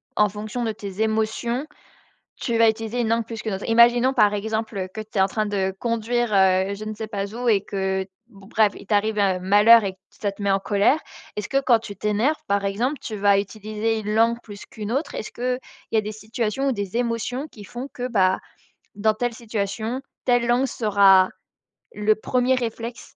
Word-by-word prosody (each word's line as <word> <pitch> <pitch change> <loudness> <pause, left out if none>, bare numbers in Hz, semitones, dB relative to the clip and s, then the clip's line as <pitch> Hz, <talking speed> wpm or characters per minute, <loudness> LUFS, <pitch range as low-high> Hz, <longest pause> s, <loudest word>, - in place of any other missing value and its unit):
qu'en 210 -1 +4
fonction 215 +4 -5
de 225 - 0
tes 200 -1 -6
émotions, 220 +5 -1 0.7
tu 235 -3 -2
vas 230 0 +6
utiliser 225 +2 -2
une 230 - 0
langue 230 +1 +1
plus 225 -1 -6
qu'une 220 - -3
autre? 190 - -5
Imaginons, 240 +3 +5
par 210 -6 +4
exemple, 220 +1 -3
heu, 185 - -3
que 220 - -6
tu 215 -1 -6
es - - +4
en 190 - +5
train 215 +2 -2
de 190 -2 -1
conduire, 235 +1 0
heu, 190 0 +3
je 210 - -7
ne 215 0 -5
sais 220 +1 -5
pas 200 -1 -4
où 245 +1 -2
et 205 -3 +4
que, 190 -1 -2 0.2
bon, 195 -4 -16
bref, 215 -1 +3
il - - -12
t'arrive, 210 +1 +1
heu, 195 -2 +2
malheur 205 +5 +6
et 195 - -2
que - - -38
ça 205 - -3
te 200 - -16
met 200 - +1
en 195 - +3
colère. 205 +9 +2 0.4
Est-ce 210 -2 -4
que 275 0 +2
quand 245 -4 +4
tu 205 -3 -9
t'énerves, 215 +10 0
par 200 0 0
exemple, 235 +9 -1
tu 215 - -5
vas 200 0 +4
utiliser 215 +2 -2
une 210 0 -3
langue 230 +1 +3
plus 205 -2 -10
qu'une 215 0 -6
autre? 280 +5 -2
Est-ce 215 - -6
qu'il 250 +1 -2 0.3
y - - +2
a - - +5
des 215 0 -5
situations 225 +5 -2
ou - - +2
des 205 -2 -4
émotions 245 +3 -1
qui 210 -8 -13
font 245 +6 -7
que, 250 - -4
bah, 190 -6 +3 0.6
dans 215 +2 +2
telle 245 +2 -1
situation, 225 +1 -3 0.2
telle 245 -1 +3
langue 245 +2 +3
sera 195 -5 +4 0.6
le 210 +1 +2
1er 250 +3 +1
réflexe? 235 -1 -5
220 Hz, 215 wpm, -23 LUFS, 205-235 Hz, 0.7 s, vas